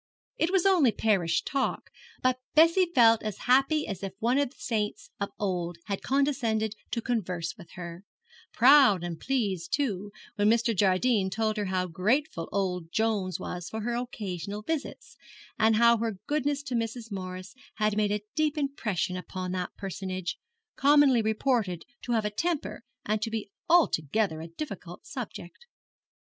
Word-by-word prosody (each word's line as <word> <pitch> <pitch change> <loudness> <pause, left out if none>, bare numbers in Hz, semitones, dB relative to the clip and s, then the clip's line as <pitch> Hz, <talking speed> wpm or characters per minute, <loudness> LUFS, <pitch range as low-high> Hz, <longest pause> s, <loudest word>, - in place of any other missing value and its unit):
It 325 - +1
was 385 -2 +2
only 350 -11 +5
parish 185 -7 +1
talk, 275 -1 -2 0.3
but 255 0 +2 0.2
Bessie 335 +4 +6
felt 230 -2 +6
as 215 -3 -4
happy 275 +4 +3
as 195 -4 -5
if 195 -1 -5
one 240 +6 +2
of 285 - +1
the 280 - -23
saints 210 -3 -3
of 200 - -2
old 175 -4 -2
had 200 -2 -3
condescended 250 -6 +1 0.2
to 235 - -2
converse 180 -8 -2
with 175 -5 -14
her 175 0 -8 0.5
proud 250 -8 +6
and 170 -2 -4
pleased, 200 -10 -1
too, 205 -9 -1 0.3
when 205 0 +3
Mr. 230 0 +2
Jardine 195 +2 +2
told 215 +2 0
her 210 - -1
how 185 -1 0
grateful 185 - 0
old 180 -4 -2
Jones 205 -5 0
was 175 -1 -5
for 220 - -4
her 240 +2 -2
occasional 210 -4 -4
visits, 320 - -4 0.4
and 220 0 +4
how 235 +1 +5
her 225 -3 -2
goodness 290 -1 0
to 285 - -5
Mrs. 230 0 -3
Morris 185 0 -6 0.2
had 215 -1 +1
made 210 -1 +1
a 210 0 -1
deep 310 -1 0
impression 225 - -1
upon 185 0 -5
that 185 -1 -3
personage, 185 -2 -4 0.4
commonly 280 -3 +5
reported 220 -5 0 0.2
to 240 - -2
have 220 -2 +1
'a 210 - -1
temper' 325 +6 -2 0.2
and 215 0 0
to 225 - -1
be 220 -2 -4 0.2
altogether 200 - +2
a 165 - -7
difficult 180 - -8
subject. 250 - -8
215 Hz, 160 wpm, -28 LUFS, 185-255 Hz, 0.5 s, Bessie